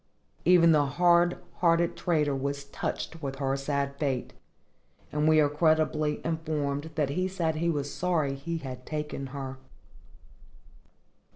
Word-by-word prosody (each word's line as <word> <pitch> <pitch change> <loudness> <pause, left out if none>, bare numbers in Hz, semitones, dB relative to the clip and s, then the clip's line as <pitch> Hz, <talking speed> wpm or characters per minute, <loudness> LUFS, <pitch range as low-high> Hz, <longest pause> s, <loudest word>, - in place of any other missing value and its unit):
Even 170 -1 +6
the 145 -2 +4
hard 175 0 +4 0.2
hearted 170 -1 +2
trader 150 -5 +1
was 140 +1 -3
touched 160 +3 -5
with 135 -2 -4
her 135 -1 -1
sad 140 0 -2
fate, 135 -4 -2 0.8
and 150 +1 +1
we 155 0 +6
are 150 - +5
credibly 155 0 +1
informed 155 -2 -2
that 150 -3 +1
he 185 +5 0
said 170 -4 -1
he 170 +2 +1
was 145 -3 -2
sorry 165 -6 0
he 160 +5 -4
had 130 -4 -7
taken 150 -1 -4
her. 135 -1 -6
150 Hz, 135 wpm, -28 LUFS, 140-165 Hz, 0.8 s, Even